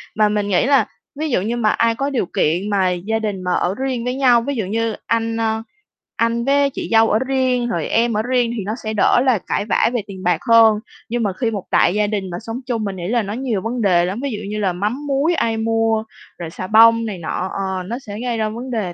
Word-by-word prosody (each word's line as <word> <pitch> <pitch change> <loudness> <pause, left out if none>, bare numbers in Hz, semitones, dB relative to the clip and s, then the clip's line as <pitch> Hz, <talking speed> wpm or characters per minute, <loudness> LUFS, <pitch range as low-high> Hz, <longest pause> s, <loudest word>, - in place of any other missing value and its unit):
Mà 210 -1 +3
mình 210 -1 -1
nghĩ 195 +2 +2
là 275 -1 +4 0.3
ví 310 0 -1
dụ 235 - +1
như 230 +5 -2
mà 215 -2 +2
ai 230 +1 +2
có 275 +3 -1
điều 255 -8 -1
kiện 175 +4 0
mà 195 -3 +2
gia 200 +6 -2
đình 205 -4 -3
mà 180 0 0
ở 180 +2 0
riêng 260 -1 -2
với 250 +1 -1
nhau, 250 -3 +4
ví 280 +4 -3
dụ 220 -6 -2
như 225 +2 -1
anh, 230 0 0
ơ, 220 0 -1 0.5
anh 230 +1 0
với 280 0 +3
chị - - -6
dâu 225 0 +5
ở 215 - +2
riêng 255 -2 +1
rồi - - -2
em 230 +1 +1
ở - - +2
riêng 245 -1 +1
thì 205 - -3
nó 215 - -2
sẽ 220 0 -3
đỡ 210 - +3
là 250 -6 +3
cãi 205 - -1
vã 210 - +2
về 240 - 0
tiền 190 -2 -9
bạc 175 -2 +2
hơn. 225 -2 +6 0.3
Nhưng 240 0 -1
mà 200 - 0
khi 230 +3 -1
một 200 -4 -4
đại 175 - +4
gia 210 0 +1
đình 200 -3 -3
mà 175 - -5
sống 225 +2 -5
chung, 230 -4 -2
mình 200 -2 -3
nghĩ 175 -1 -5
là 235 +1 +1
nó 200 - -5
nhiều 235 -4 -2
vấn 235 +3 -3
đề 175 -4 +3
lắm. 190 +5 -3
Ví 275 - -2
dụ 210 - -4
như 215 0 -3
là 190 -3 0
mắm 225 +11 -3
muối 280 +5 +1
ai 225 -7 0
mua 225 0 +1 0.3
rồi 170 -2 -6
xà 185 - -6
bông 230 +2 +6
này 210 -4 -4
nọ, 180 +2 -3
ờ, 190 -1 -3
nó 235 +7 -5
sẽ 210 -5 -8
gây 240 -2 -2
ra 215 -1 0
vấn 245 +4 -6
đề 200 -7 -2
225 Hz, 265 wpm, -19 LUFS, 200-240 Hz, 0.5 s, hơn